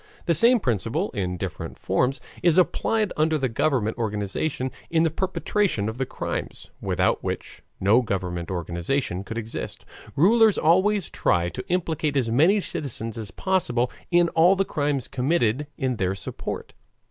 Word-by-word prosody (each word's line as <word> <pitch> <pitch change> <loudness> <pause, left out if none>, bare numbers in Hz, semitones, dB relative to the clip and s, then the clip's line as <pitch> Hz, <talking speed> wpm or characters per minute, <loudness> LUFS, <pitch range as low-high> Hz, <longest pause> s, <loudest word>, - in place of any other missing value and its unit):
The 170 - +3
same 235 - +5
principle 125 - -1
in 90 -2 -2
different - - -5
forms 130 +2 0 0.2
is 170 -1 +4
applied 210 +3 +2
under 155 +1 +2
the 135 -3 0
government 120 -2 0
organization 110 +5 -2 0.2
in 165 -1 +3
the 165 - +2
perpetration 190 - 0
of 110 +3 -5
the 130 - -1
crimes, - - -5
without - - +1
which - - -5 0.2
no 105 +6 +4
government 90 -6 -3
organization 90 - -2
could 115 +3 -6
exist. 115 0 -5 0.3
Rulers 220 +6 +5
always 190 +4 +3
try 85 0 +1
to - - -7
implicate 160 -5 0
as 120 -4 +1
many 165 - +4
citizens 115 - -4
as 110 -3 -6
possible 125 - 0 0.2
in 175 -1 +4
all 170 +4 +5
the 195 0 +1
crimes 145 -6 -1
committed 135 -1 0
in 130 -4 -1
their 95 -1 0
support. 95 - -6
135 Hz, 150 wpm, -24 LUFS, 110-170 Hz, 0.3 s, same